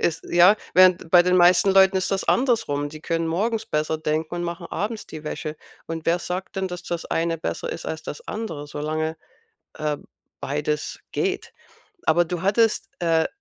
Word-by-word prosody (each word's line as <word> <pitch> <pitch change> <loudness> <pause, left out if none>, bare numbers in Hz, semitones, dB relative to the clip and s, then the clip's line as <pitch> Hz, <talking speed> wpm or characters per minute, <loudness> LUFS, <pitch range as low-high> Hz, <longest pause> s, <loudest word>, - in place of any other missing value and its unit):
Ist 165 - 0
ja, 175 +4 +6 0.2
während 185 -2 +5
bei 175 0 +8
den 180 +1 +3
meisten 180 +2 +6
Leuten 190 0 +5
ist 185 - 0
das 195 -1 0
andersrum. 215 - +1
Die 155 +1 -10
können 165 +1 -1
morgens 220 +6 -1
besser 155 +1 -1
denken 155 +1 -2
und 175 - -2
machen 170 0 -4
abends 210 +3 -4
die 155 - -9
Wäsche. 155 0 -4 0.3
Und 165 -1 -5
wer 170 +1 +3
sagt 180 +3 -5
denn, 190 0 0
dass 180 -1 -6
das 170 -1 -4
eine 165 0 -1
besser - - -3
ist 165 - -6
als 160 0 -4
das 150 - -8
andere, 165 -10 -5
solange, 155 +2 -3 0.6
äh, 150 -1 -2 0.4
beides 150 +2 -2
geht? - - -2 0.5
Aber 170 +2 +4
du 175 0 -4
hattest, 225 +3 +2
äh, 165 -2 +2
170 Hz, 180 wpm, -23 LUFS, 155-190 Hz, 0.6 s, bei